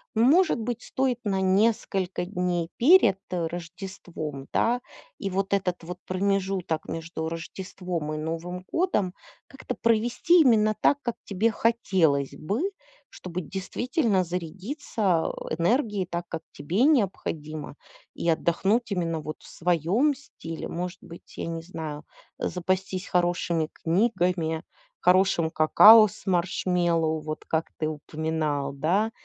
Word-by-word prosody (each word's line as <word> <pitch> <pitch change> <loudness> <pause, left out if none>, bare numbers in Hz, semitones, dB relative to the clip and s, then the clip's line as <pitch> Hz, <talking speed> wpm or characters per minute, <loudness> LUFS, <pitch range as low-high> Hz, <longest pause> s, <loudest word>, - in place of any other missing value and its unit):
Может 285 +7 +4
быть, 240 +1 -3
стоит 260 -2 -1
на 195 -3 0
несколько 190 -2 +1
дней 180 -3 -1
перед, 240 - +6
э, 170 -2 -1
Рождеством, 165 -4 -7
да, 245 +2 +2 0.4
и 195 - -3
вот 195 +1 -1
этот 185 -3 0
вот 180 +2 -6
промежуток 190 -3 -1
между 160 0 -4
Рождеством 170 -1 -5
и - - -3
Новым 165 +4 -4
годом 210 - +1 0.3
как-то 265 -2 -6
провести 240 +10 +4
именно 215 -6 +4
так, 285 - +4
как 240 -2 -2
тебе 210 +4 +1
хотелось 190 - +1
бы, 200 - -3 0.5
чтобы 180 0 -6
действительно 200 - 0
зарядиться, 185 - -2
а, - - -1 0.3
энергией 210 - +1
так, 175 0 -4
как 165 - -5
тебе 185 - -1
необходимо, 165 - 0 0.4
и - - -4
отдохнуть 195 +8 +1
именно 165 -4 -1
вот 155 0 -6
в - - -14
своём 180 - +1
стиле? 165 - -8
Может 180 +1 -4
быть, 170 - -13
я - - -3
не 165 0 -4
знаю, 155 -3 -6 0.3
э, - - 0
запастись 185 +1 -2
хорошими 175 -2 +1
книгами, 175 -4 0 0.4
хорошим 180 -3 +3
какао 215 +8 +8
с 190 - -13
маршмеллоу 175 -3 +1
вот 155 0 -6
как 160 0 -1
ты 155 - -1
упоминал, 155 -2 -2
да, 180 +11 +1
180 Hz, 125 wpm, -26 LUFS, 165-210 Hz, 0.5 s, какао